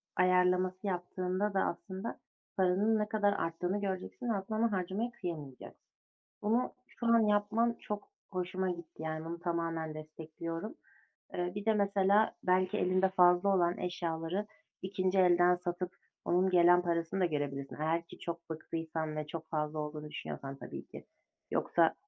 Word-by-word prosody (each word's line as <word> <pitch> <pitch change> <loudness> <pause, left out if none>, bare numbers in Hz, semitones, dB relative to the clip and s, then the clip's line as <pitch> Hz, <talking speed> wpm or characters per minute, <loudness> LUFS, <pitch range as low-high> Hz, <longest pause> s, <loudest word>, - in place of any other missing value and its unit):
ayarlaması 185 +1 +3
yaptığında 185 +2 -1
da 195 - +2
aslında 190 +5 -3 0.4
paranın 195 +4 +3
ne 210 0 -1
kadar 205 -2 +3
arttığını 180 +4 -1
göreceksin 195 +5 -3
aslında 215 0 -1
ama 230 0 +2
harcamaya 195 +5 -1
kıyamayacaksın. 160 - -7 0.5
Bunu 230 +4 +1
şu 235 - -8
an 230 0 +6
yapman 215 +3 +2
çok 210 -1 -5 0.2
hoşuma 185 0 -1
gitti. 170 -2 -7
Yani, 155 0 -3
bunu 170 +1 -5
tamamen 165 -2 -2
destekliyorum. 160 - -6 0.6
Eee, 180 0 -1
bir 205 0 -4
de 220 0 +4
mesela 200 +1 +3
belki 185 0 +2
elinde 185 +1 +3
fazla 180 +1 +5
olan 175 0 +2
eşyaları 175 +2 -2 0.4
2'nci 190 0 0
elden 180 -1 +6
satıp 175 +1 -3 0.3
onun 185 +2 +3
gelen 175 0 +6
parasını 170 +2 -1
da - - +4
görebilirsin. 140 -3 -3
Eğer 165 +2 0
ki - - -12
çok 170 -1 -6
bıktıysan 160 -1 -3
ve 155 -1 -2
çok 160 +1 -7
fazla 150 -1 -1
olduğunu 150 0 -5
düşünüyorsan 140 -2 -6
tabii - - -8
ki. - - -11 0.4
Yoksa - - +3
180 Hz, 145 wpm, -33 LUFS, 165-195 Hz, 0.6 s, an